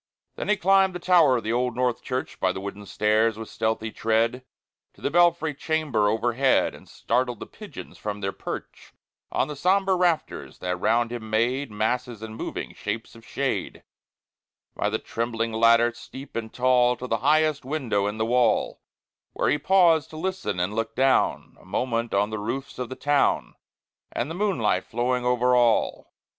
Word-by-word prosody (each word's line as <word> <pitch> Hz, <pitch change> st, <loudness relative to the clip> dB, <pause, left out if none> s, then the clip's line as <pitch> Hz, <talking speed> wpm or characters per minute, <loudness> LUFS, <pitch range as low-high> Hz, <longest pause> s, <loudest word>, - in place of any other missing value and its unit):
Then -, -, -5 dB
he 210 Hz, -, +3 dB
climbed 190 Hz, 0 st, +3 dB
the -, -, -3 dB
tower 170 Hz, -8 st, +5 dB
of 115 Hz, -, -4 dB
the 110 Hz, -, -1 dB
Old 125 Hz, 0 st, 0 dB
North 125 Hz, -1 st, 0 dB
Church, 130 Hz, 0 st, -4 dB
By 95 Hz, -, +2 dB
the 95 Hz, -, -5 dB
wooden 100 Hz, +1 st, -7 dB
stairs, 105 Hz, +2 st, +2 dB
with 110 Hz, -1 st, -7 dB
stealthy 110 Hz, 0 st, -2 dB
tread, 115 Hz, +4 st, 0 dB, 0.5 s
To -, -, -20 dB
the -, -, -1 dB
belfry 170 Hz, -2 st, +3 dB
chamber 145 Hz, -8 st, 0 dB
overhead, 120 Hz, +4 st, +2 dB
And -, -, -15 dB
startled 125 Hz, -2 st, -1 dB
the -, -, -6 dB
pigeons -, -, -11 dB
from 105 Hz, -1 st, -4 dB
their 95 Hz, -1 st, -2 dB
perch -, -, -8 dB, 0.4 s
On -, -, +1 dB
the 150 Hz, -, -6 dB
sombre 190 Hz, +5 st, +2 dB
rafters, 175 Hz, -3 st, -1 dB
that 90 Hz, 0 st, -2 dB
round 115 Hz, +5 st, +1 dB
him 115 Hz, -2 st, -6 dB
made 120 Hz, +6 st, 0 dB
Masses 110 Hz, +2 st, -2 dB
and 110 Hz, 0 st, -7 dB
moving -, -, -5 dB
shapes 110 Hz, +2 st, -5 dB
of 115 Hz, -, -15 dB
shade, 135 Hz, +3 st, -3 dB, 0.9 s
By 105 Hz, -, 0 dB
the 110 Hz, -, 0 dB
trembling 115 Hz, 0 st, -3 dB
ladder, 115 Hz, +1 st, +4 dB
steep 130 Hz, +3 st, -11 dB
and 110 Hz, -1 st, -4 dB
tall, 125 Hz, -1 st, +3 dB
To 125 Hz, -, -6 dB
the 115 Hz, -2 st, 0 dB
highest 150 Hz, +3 st, +2 dB
window 125 Hz, -8 st, -1 dB
in 105 Hz, +1 st, -3 dB
the 110 Hz, -, 0 dB
wall, 125 Hz, +2 st, +1 dB, 0.5 s
Where -, -, 0 dB
he 150 Hz, -, +1 dB
paused 165 Hz, -1 st, +4 dB
to 155 Hz, -, -10 dB
listen 165 Hz, -, -3 dB
and 90 Hz, +4 st, -1 dB
look 115 Hz, 0 st, -3 dB
down 135 Hz, +1 st, +1 dB
A -, -, -20 dB
moment 115 Hz, -2 st, -1 dB
on 100 Hz, +2 st, +1 dB
the 110 Hz, -, -3 dB
roofs 130 Hz, +7 st, -5 dB
of 125 Hz, -, -3 dB
the 130 Hz, -, -6 dB
town, 145 Hz, 0 st, +1 dB, 0.6 s
And 125 Hz, +6 st, -3 dB
the -, -, -3 dB
moonlight 165 Hz, -, 0 dB
flowing 125 Hz, +2 st, -1 dB
over 125 Hz, 0 st, +3 dB
all. 120 Hz, -2 st, +2 dB
120 Hz, 180 wpm, -25 LUFS, 110-140 Hz, 0.9 s, tower